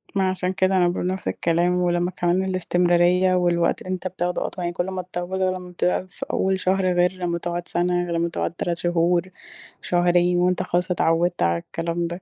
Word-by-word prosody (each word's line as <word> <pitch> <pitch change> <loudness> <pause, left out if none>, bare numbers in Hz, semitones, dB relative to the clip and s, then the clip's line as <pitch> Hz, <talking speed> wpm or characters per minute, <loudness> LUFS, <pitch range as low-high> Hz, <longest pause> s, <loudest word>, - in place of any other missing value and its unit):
ما 190 -1 +2
عشان 185 0 -1
كده 190 0 +2
أنا 175 -1 +4
باقول 175 0 -1
نفْس 185 +1 -3
الكلام 170 +2 +1
ولمّا 175 0 +1
كمان 175 +1 0
الاستمرارية 180 0 +2
والوقت 175 -1 +1
اللي - - -9
أنت 185 0 -3
بتاخده 180 -1 -2
أطول 180 - -5
يعني 175 - -2
كل 175 - -1
ما 185 -1 -3
تطوّله 180 +1 -3
ولمّا 185 -1 -3
بتبقى 180 +1 0
فأول 190 +1 -1
شهر 185 0 +1
غِير 180 +1 +3
لمّا 175 -2 -2
تقعد 175 0 -4
سنة، 175 0 0
غِير 175 - -5
لمّا 170 +1 0
تقعد - - -2
3 170 0 -2
شهور، 175 0 +2 0.6
شهرين 175 0 +2
وأنت 180 0 +1
خلاص 180 +1 -1
اتعودت 175 0 +1
على 85 0 +2
الكلام 170 - -3
ده 175 +2 -6
175 Hz, 190 wpm, -23 LUFS, 175-185 Hz, 0.6 s, أنا